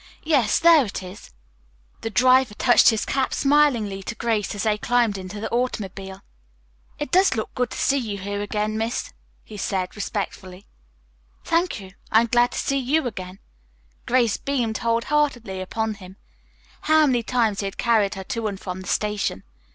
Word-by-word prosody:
Yes, 275 -9 +2
there 330 -3 +6
it 200 -4 -5
is." 185 +3 -11 0.7
The 225 - -3
driver 255 -1 +4
touched 245 +2 +5
his 220 -2 0
cap 265 -1 -1
smilingly 265 -9 +2
to 225 - -6
Grace 220 -3 -1
as 205 - -3
they 215 -1 +1
climbed 240 -3 +1
into 190 +2 -7
the 220 - -3
automobile, 195 -5 -3 0.7
"It 295 - -5
does 375 -4 +4
look 220 - -4
good 250 -2 -1
to - - -7
see 280 - +2
you 215 -5 -4
here 200 +1 -4
again, 210 +1 -2
miss," 230 +2 -3 0.3
he 215 - -11
said 190 -2 -2
respectfully. 195 -2 -5 0.8
"Thank 335 -4 0
you. 190 -2 -11 0.2
I'm 225 +2 +5
glad 240 +1 +2
to - - -5
see 275 0 0
you 280 +4 +1
again." 185 -5 -6 0.7
Grace 240 -3 +2
beamed 240 -6 -2
whole 230 0 +1
heartedly 245 -10 0
upon 220 +3 -2
him. 190 -1 -13 0.7
How 310 0 +5
many 250 -4 +2
times 230 -3 0
he 200 - -2
had 195 - -5
carried 220 -5 +2
her 190 - -6
to 230 -1 -3
and 200 -2 -5
from 185 -1 -6
the 185 - -10
station. 210 - -1
220 Hz, 175 wpm, -23 LUFS, 200-250 Hz, 0.8 s, there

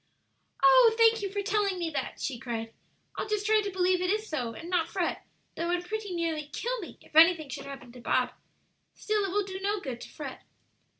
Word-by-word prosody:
"Oh, 460 +4 +7
thank 455 -1 +5
you 395 -1 -3
for 405 0 -2
telling 400 -1 +1
me 340 -2 -2
that!" 295 - -4
she 260 -5 -3
cried. 225 -3 -4 0.4
"I'll - - -2
just 425 -1 -1
try 430 0 +4
to 405 - -3
believe 365 -1 +2
it 365 - 0
is 430 +2 0
so 245 - -3
and 330 - -8
not 350 -2 +1
fret, 355 0 -2 0.3
though 335 +1 -2
it 350 - +3
would 355 0 -5
pretty 430 +1 -4
nearly 325 -3 -2
kill 485 +11 -3
me 365 - -9
if - - -20
anything 320 -2 +6
should 270 - -6
happen 275 -3 -9
to 245 0 -12
Bob. - - +1 0.6
Still, 425 -1 0
it - - -2
will 410 +1 +1
do 380 -1 -6
no 405 +1 0
good 255 -8 -6
to - - -9
fret." 280 -4 -8
365 Hz, 225 wpm, -29 LUFS, 310-415 Hz, 0.6 s, Oh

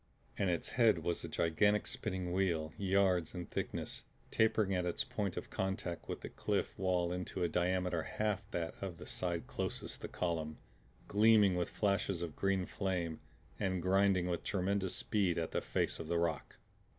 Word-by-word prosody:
And 100 -2 +1
its 85 -2 -1
head 110 -8 +4
was 85 +1 -1
a - - -3
gigantic 105 +6 +2
spinning 95 -4 -2
wheel, 85 -5 +1
yards 95 -3 +2
in 90 -1 -4
thickness, - - -4 0.3
tapering 110 -3 +3
at 90 -1 +1
its 90 -1 0
point 100 -4 -3
of - - -5
contact 95 -3 -3
with - - -3
the - - -6
cliff - - -1
wall 90 -2 +1
into 90 +1 -3
a - - +3
diameter 90 0 +1
half 105 +6 -2
that 85 -1 -2
of 95 -4 -4
the 90 - -9
side 85 -2 -2
closest - - -4
the - - -4
column, 80 -3 -2 0.5
gleaming 105 -2 +5
with 90 -1 0
flashes 100 -3 0
of 80 -3 -5
green 95 -2 +1
flame 90 -5 -2 0.4
and 95 -2 0
grinding 95 -1 +4
with 90 -1 -1
tremendous 95 -1 0
speed 95 -5 +1
at 80 -1 -1
the - - 0
face - - -1
of 80 - -5
the 85 +1 +1
rock. 85 -1 -1
90 Hz, 175 wpm, -35 LUFS, 85-100 Hz, 0.5 s, gleaming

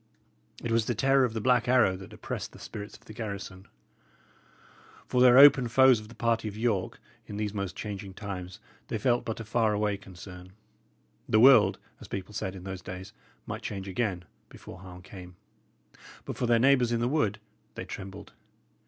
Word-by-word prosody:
It 120 - -2
was 115 -1 +2
the 120 - 0
terror 135 +2 +3
of 115 - -3
the 110 - -2
Black 125 0 +2
Arrow 125 -7 +4
that 95 0 -11
oppressed - - -6
the - - -12
spirits 105 0 -8
of - - -28
the 110 - -11
garrison. 100 -3 -7 1.4
For 125 - +1
their 125 0 +7
open 140 -2 +8
foes 130 0 +5
of 110 - -11
the 115 - -14
party 115 -1 0
of 105 0 -6
York, 110 -5 -1 0.3
in 100 - -7
these 105 -1 -2
most 100 -3 -4
changing 100 -2 -6
times, 95 -1 -7 0.3
they 115 - -2
felt 120 +3 +1
but 115 - -4
a - - -5
far 110 -1 +1
away 105 -1 0
concern. 90 -1 -12 0.8
"The 110 - +4
world," 115 -6 +7 0.2
as - - -11
people 100 +2 -6
said 95 -2 -4
in 90 - -10
those 95 -1 -6
days, 95 +2 -8 0.3
"might - - -6
change 100 -1 -5
again" 95 -3 -2 0.2
before 95 - -12
harm 90 -1 -12
came. 90 -2 -11 0.9
But - - -5
for 125 - -1
their 120 0 +4
neighbours 125 -1 +4
in 120 - +1
the 120 - 0
wood, 110 -7 0 0.4
they - - -6
trembled. 95 +2 -9
105 Hz, 190 wpm, -28 LUFS, 95-120 Hz, 1.4 s, open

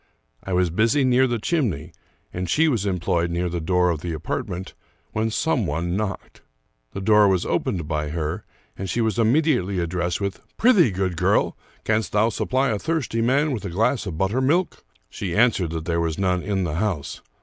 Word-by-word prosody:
I 95 - -4
was 90 -2 +2
busy 115 - +2
near 130 0 +4
the 120 -1 -1
chimney, 105 - -1 0.4
and 90 -1 -3
she 160 - +3
was 115 -9 0
employed 85 -2 0
near 85 +1 -1
the 85 0 -3
door 90 +2 +2
of 80 -3 -3
the 85 -2 -3
apartment, 90 +4 -4 0.4
when 110 +1 0
some 120 - 0
one 85 +4 -2
knocked. 100 -1 -4 0.5
The 100 - -5
door 105 +1 +5
was 95 -2 +1
opened 85 -5 -1
by 75 -1 -2
her, 80 +4 -3 0.3
and 95 0 -5
she 120 - -1
was 110 -2 0
immediately 115 - +2
addressed 85 0 -1
with, 100 -1 -3
" - - -39
Prythee, 210 - +5
good 95 -2 -2
girl, - - +2 0.3
canst 110 0 0
thou 105 +2 +3
supply 130 +4 0
a 105 -2 -1
thirsty 150 -7 -1
man 140 +6 +2
with 120 -6 -3
a 100 - -4
glass 115 +5 0
of 80 -4 -5
buttermilk? 130 - +1
" - - -34
She 90 -4 -4
answered 110 -6 +3
that 80 0 -4
there 85 0 0
was 80 -2 -1
none 90 -2 +1
in 95 0 -1
the 80 -3 -2
house. 95 -7 -2
95 Hz, 195 wpm, -23 LUFS, 85-115 Hz, 0.5 s, door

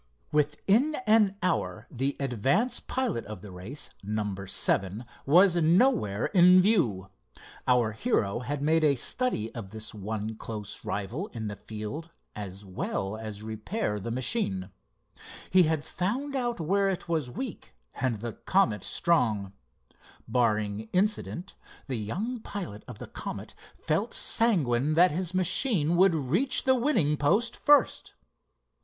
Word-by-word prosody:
Within 195 - +2
an 210 -3 +4
hour 185 - -1
the 135 +1 -1
advance 140 - +1
pilot 255 - -2
of 105 -4 -8
the 100 - -9
race, 95 +11 -8
number 105 -2 -3
seven, 100 +4 -1 0.2
was 175 +4 +6
nowhere 170 - +3
in 180 -1 +6
view. 120 - +2 0.6
Our 125 -3 +3
hero 110 - 0
had 140 +3 -3
made 160 +1 +3
a 145 -2 +4
study 130 - -1
of 110 -5 -7
this 110 +1 -6
one 110 +1 -4
close 105 -3 -6
rival 115 - -3
in 110 -3 -4
the 105 - -5
field 110 +12 -7 0.3
as 100 -1 -7
well 95 +1 -3
as 110 -1 -7
repair 110 - -3
the 115 - -5
machine. 115 - -1 0.8
He 185 - +6
had 160 -2 0
found 260 +10 -2
out 240 -4 -1
where 195 +5 +2
it 185 -3 -3
was 160 -6 -1
weak 125 - -7 0.2
and 125 -5 -2
the 120 -1 -4
Comet 115 - +1
strong. 110 - +1 0.7
Barring 110 -3 0
accident, 195 -1 0 0.3
the 130 -3 -2
young 210 - -3
pilot 180 - -6
of 125 - -9
the - - -7
Comet - - -7 0.2
felt - - -1
sanguine 155 - +2
that 175 +1 +6
his 180 +3 -2
machine 185 - +3
would 185 -1 +5
reach 160 - +1
the 260 - +4
winning 230 - +2
post 200 +12 +2
first. 290 -3 +3
140 Hz, 135 wpm, -28 LUFS, -, 0.8 s, was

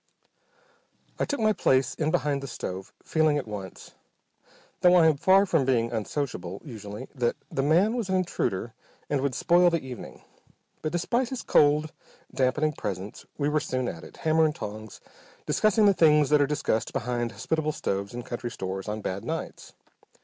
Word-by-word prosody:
I - - +2
took 285 - -3
my 215 -1 +3
place 130 -8 +2
in 155 -1 -1
behind 145 -3 0
the 140 - -6
stove, 95 -6 -6
feeling 155 -2 +2
at 135 - -4
once, 100 -3 -8 0.9
though 180 -1 +6
I 170 -2 +6
am 160 -2 +5
far 190 +6 +5
from 165 -7 +2
being 120 -3 +1
unsociable 105 - -3
usually, 110 -2 -8
that 125 -4 0 0.2
the 135 - 0
man 175 - +3
was 230 -6 -2
an 190 - +1
intruder 120 - -1 0.4
and 140 -2 +1
would 135 -2 -1
spoil 175 0 +4
the 170 -1 0
evening. 125 -2 -9 0.6
But 155 - -2
despite 235 +8 0
his 260 - -5
cold, 150 +1 +3 0.4
dampening 150 +4 +1
presence 100 -4 -6
we 145 - 0
were 150 +1 +2
soon 130 -3 -2
at 85 -6 -6
it, - - -13
hammer 160 0 +3
and 155 -1 0
tongs, 110 0 -8 0.4
discussing 215 0 +3
the 200 - +6
things 150 -4 +4
that 150 -1 +5
are 140 - +3
discussed 135 -6 -1
behind 120 -1 -2
hospitable 155 +8 -1
stoves 100 -7 -3
in 120 0 -6
country 120 0 -5
stores 95 -2 -5
on 105 +1 -3
bad 95 0 -4
nights. - - -5
140 Hz, 175 wpm, -27 LUFS, 115-160 Hz, 0.9 s, though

